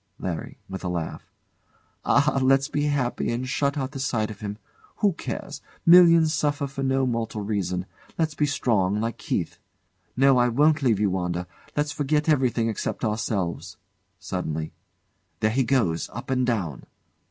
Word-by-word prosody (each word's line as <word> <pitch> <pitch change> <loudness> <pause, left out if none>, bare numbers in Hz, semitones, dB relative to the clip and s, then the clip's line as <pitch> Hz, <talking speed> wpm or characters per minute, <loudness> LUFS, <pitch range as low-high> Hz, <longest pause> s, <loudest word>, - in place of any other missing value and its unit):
LARRY. 85 -4 -5
[With 95 0 -7
a - - -2
laugh] 85 -2 -4 0.7
Ah! 140 -1 +3
Let's 135 +1 +4
be 145 -1 -1
happy 140 -4 0
and 125 +2 -2
shut 140 +3 0
out 135 -1 -2
the 140 - -7
sight 115 -5 -1
of 105 - -10
him. 105 0 -5 0.4
Who 205 -3 +2
cares? - - -6 0.2
Millions 170 -2 +7
suffer 145 -2 0
for 140 0 -6
no 135 0 +1
mortal 115 -3 -2
reason. 95 -3 -2 0.3
Let's 160 -2 0
be 150 0 +1
strong, 105 -8 +1
like 115 +1 -3
Keith. - - -3 0.6
No! 135 -1 +5
I 120 - +4
won't 150 +5 +3
leave 115 -7 +2
you, 105 -2 +2
Wanda. 90 -1 -2 0.3
Let's 145 0 +1
forget 150 +2 0
everything 130 -6 +2
except 115 +2 -2
ourselves. 105 -5 -2 0.4
[Suddenly] 80 -4 -4 0.7
There 110 0 +2
he 130 +4 +2
goes 115 -11 +1
up 125 +3 -6
and 130 -1 +1
down! 95 - -2
125 Hz, 160 wpm, -25 LUFS, 105-140 Hz, 0.7 s, Millions